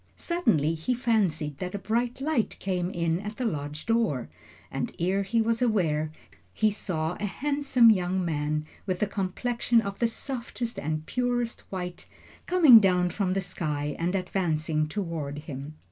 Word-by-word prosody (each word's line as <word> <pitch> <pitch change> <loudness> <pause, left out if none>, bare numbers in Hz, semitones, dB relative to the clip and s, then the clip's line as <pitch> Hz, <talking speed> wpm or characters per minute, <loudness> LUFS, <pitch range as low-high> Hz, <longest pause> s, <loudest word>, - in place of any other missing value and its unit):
Suddenly 165 - +1
he 165 +11 -1
fancied 185 - 0
that 180 +1 -4
a - - 0
bright 235 +6 -1
light 285 -6 0
came 180 -2 -1
in 170 -2 0
at 210 +2 -6
the 255 - -2
lodge 150 -5 -3
door, 225 - +1 0.4
and - - -3
ere 185 +3 +1
he 225 +3 +1
was 230 +1 0
aware, 160 -10 +1 0.4
he 215 -1 +3
saw 170 -5 -2
a 210 - -1
handsome 275 -1 +4
young 185 -2 +1
man, 150 -1 -1 0.2
with 185 +1 0
a - - +4
complexion 230 +5 0
of 200 -3 -4
the 235 - +3
softest 235 -1 -5
and 155 +1 -3
purest 245 0 -1
white, 180 -2 -5 0.4
coming 315 -10 +9
down 180 -3 +3
from 190 -3 0
the 195 - 0
sky 150 -5 -3
and 175 +3 0
advancing 160 -5 0
toward 160 -5 -4
him. 140 +1 -7
190 Hz, 160 wpm, -27 LUFS, 160-230 Hz, 0.4 s, coming